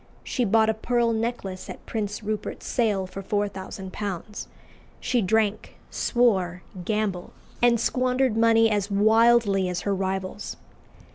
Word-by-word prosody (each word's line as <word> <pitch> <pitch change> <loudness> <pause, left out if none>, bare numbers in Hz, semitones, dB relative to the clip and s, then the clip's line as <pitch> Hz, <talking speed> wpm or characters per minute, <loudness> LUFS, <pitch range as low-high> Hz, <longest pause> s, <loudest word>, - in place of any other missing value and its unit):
She 250 - -1
bought 220 +1 +4
a 220 - +2
pearl 235 +1 +1
necklace 220 -5 -3
at - - -9
Prince 210 -1 -4
Rupert's 215 0 -4
sale 210 -6 0
for 195 +1 -7
£4000. 200 0 -4 0.5
She 250 -2 0
drank, 215 +1 0 0.2
swore, 190 -8 +1 0.2
gambled, 210 -3 -2 0.3
and 240 -1 +4
squandered 255 0 +1
money 225 0 +5
as 205 -1 0
wildly 215 -1 +4
as 180 -1 -3
her 200 - -1
rivals. 190 +1 -3
210 Hz, 125 wpm, -25 LUFS, 195-230 Hz, 0.5 s, money